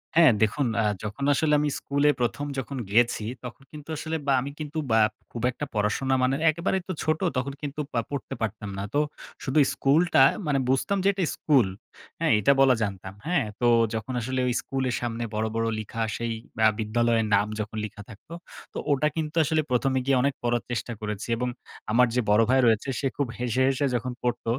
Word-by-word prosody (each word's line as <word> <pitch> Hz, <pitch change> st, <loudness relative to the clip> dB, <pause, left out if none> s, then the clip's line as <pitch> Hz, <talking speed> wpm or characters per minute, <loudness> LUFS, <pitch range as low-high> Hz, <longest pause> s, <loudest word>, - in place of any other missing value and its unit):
হ্যাঁ, 165 Hz, -6 st, +7 dB
দেখুন 125 Hz, +6 st, +1 dB
আ -, -, +1 dB, 0.2 s
যখন 105 Hz, +6 st, -5 dB
আসলে 150 Hz, +2 st, +2 dB
আমি 150 Hz, 0 st, +1 dB
স্কুলে 140 Hz, +1 st, +1 dB
প্রথম 125 Hz, +4 st, -1 dB
যখন 135 Hz, +2 st, -5 dB
গিয়েছি, 115 Hz, 0 st, +3 dB, 0.2 s
তখন 125 Hz, +2 st, -9 dB
কিন্তু 150 Hz, 0 st, -11 dB
আসলে 160 Hz, +2 st, -3 dB
বা 140 Hz, -, +4 dB
আমি 140 Hz, +3 st, -5 dB
কিন্তু 155 Hz, +1 st, -5 dB
বা 110 Hz, -, +5 dB, 0.3 s
খুব 115 Hz, -, -6 dB
একটা 150 Hz, -, -5 dB
পড়াশোনা 110 Hz, +5 st, 0 dB
মানে 130 Hz, +1 st, +2 dB
একেবারে 170 Hz, +4 st, 0 dB
তো 185 Hz, -, -2 dB
ছোট, 155 Hz, 0 st, +1 dB, 0.2 s
তখন 135 Hz, +2 st, -2 dB
কিন্তু 145 Hz, 0 st, -5 dB
পা 120 Hz, -, +1 dB
পড়তে 140 Hz, -3 st, -5 dB
পারতাম 105 Hz, -2 st, -3 dB
না। 100 Hz, -, -3 dB
তো 145 Hz, -, +3 dB, 0.4 s
শুধু 135 Hz, +3 st, +1 dB
স্কুলটা 155 Hz, +2 st, +3 dB, 0.3 s
মানে 140 Hz, -2 st, +2 dB
বুঝতাম 135 Hz, +9 st, +1 dB
যে -, -, +3 dB
এটা 190 Hz, -1 st, -1 dB
স্কুল। 135 Hz, -9 st, +3 dB, 0.5 s
হ্যাঁ, -, -, +2 dB
এটা 105 Hz, -, +4 dB
বলা 135 Hz, -2 st, +6 dB
জানতাম, 95 Hz, -2 st, -5 dB
হ্যাঁ? 175 Hz, -8 st, +2 dB
তো 120 Hz, -, +2 dB, 0.3 s
যখন 110 Hz, +3 st, -4 dB
আসলে 130 Hz, +3 st, -2 dB
ওই 125 Hz, -, +1 dB
স্কুলের 130 Hz, -2 st, -2 dB
সামনে 120 Hz, -1 st, -3 dB
বড়, 110 Hz, +1 st, 0 dB
বড় 115 Hz, 0 st, 0 dB
লিখা 110 Hz, +1 st, -5 dB, 0.2 s
সেই 115 Hz, 0 st, -2 dB, 0.4 s
আ -, -, +6 dB
বিদ্যালয়ের 115 Hz, +1 st, +1 dB
নাম 100 Hz, +1 st, +2 dB
যখন 105 Hz, +1 st, -4 dB
লিখা 105 Hz, -1 st, -9 dB
থাকতো, 110 Hz, +9 st, -12 dB, 0.4 s
তো -, -, -6 dB
ওটা 145 Hz, +2 st, +3 dB
কিন্তু 155 Hz, -1 st, -3 dB
আসলে 155 Hz, +1 st, +1 dB
প্রথমে 130 Hz, +1 st, +2 dB
গিয়ে 135 Hz, -1 st, +3 dB
অনেক 140 Hz, +2 st, +1 dB
পড়ার 120 Hz, -1 st, 0 dB
চেষ্টা 120 Hz, 0 st, -3 dB
করেছি 105 Hz, 0 st, -4 dB
এবং 125 Hz, +1 st, -1 dB, 0.4 s
আমার 125 Hz, +3 st, +5 dB
যে 125 Hz, -, +3 dB
বড় 105 Hz, +2 st, +5 dB
ভাই 130 Hz, +1 st, +4 dB
রয়েছে, 115 Hz, +4 st, +2 dB
সে 140 Hz, -, 0 dB
খুব 140 Hz, -3 st, 0 dB
হেসে, 125 Hz, +1 st, +1 dB
হেসে 135 Hz, +1 st, 0 dB
যখন 125 Hz, +2 st, -2 dB
পড়ত, 120 Hz, -1 st, -1 dB
130 Hz, 200 wpm, -26 LUFS, 115-145 Hz, 0.5 s, হ্যাঁ